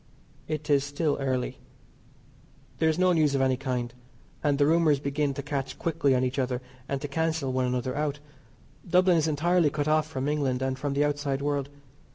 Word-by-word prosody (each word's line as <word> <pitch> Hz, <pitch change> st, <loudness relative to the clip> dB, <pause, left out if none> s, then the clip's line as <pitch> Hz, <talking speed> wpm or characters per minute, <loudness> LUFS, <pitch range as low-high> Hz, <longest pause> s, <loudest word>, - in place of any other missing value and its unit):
It 155 Hz, -1 st, -4 dB
is 140 Hz, -2 st, +3 dB
still 145 Hz, +1 st, -1 dB
early. 130 Hz, -2 st, -2 dB, 1.2 s
There 160 Hz, -, +3 dB
is 160 Hz, -, 0 dB
no 185 Hz, 0 st, +4 dB
news 155 Hz, -4 st, +3 dB
of 135 Hz, -, +1 dB
any 130 Hz, -1 st, +3 dB
kind, 125 Hz, -2 st, -3 dB, 0.5 s
and 145 Hz, -2 st, +2 dB
the 145 Hz, -, +4 dB
rumours 155 Hz, -2 st, +3 dB
begin 140 Hz, 0 st, -1 dB
to 140 Hz, -, -4 dB
catch 140 Hz, -2 st, -3 dB
quickly 160 Hz, -5 st, +1 dB
on 125 Hz, -, +2 dB
each 130 Hz, +2 st, -1 dB
other 125 Hz, -1 st, -1 dB, 0.3 s
and 140 Hz, -, -1 dB
to 145 Hz, -, -3 dB
cancel 160 Hz, -2 st, -1 dB
one 130 Hz, 0 st, +1 dB
another 125 Hz, 0 st, -1 dB
out. 145 Hz, -1 st, -1 dB, 0.7 s
Dublin 180 Hz, 0 st, +4 dB
is 160 Hz, 0 st, +2 dB
entirely 165 Hz, +2 st, +2 dB
cut 145 Hz, 0 st, -2 dB
off 155 Hz, 0 st, +2 dB
from 135 Hz, -3 st, -3 dB
England, 135 Hz, -4 st, 0 dB
and 130 Hz, 0 st, -2 dB
from 145 Hz, +1 st, -2 dB
the 145 Hz, +1 st, +2 dB
outside 145 Hz, -1 st, -1 dB
world. 145 Hz, -1 st, -1 dB
145 Hz, 195 wpm, -27 LUFS, 135-155 Hz, 1.2 s, no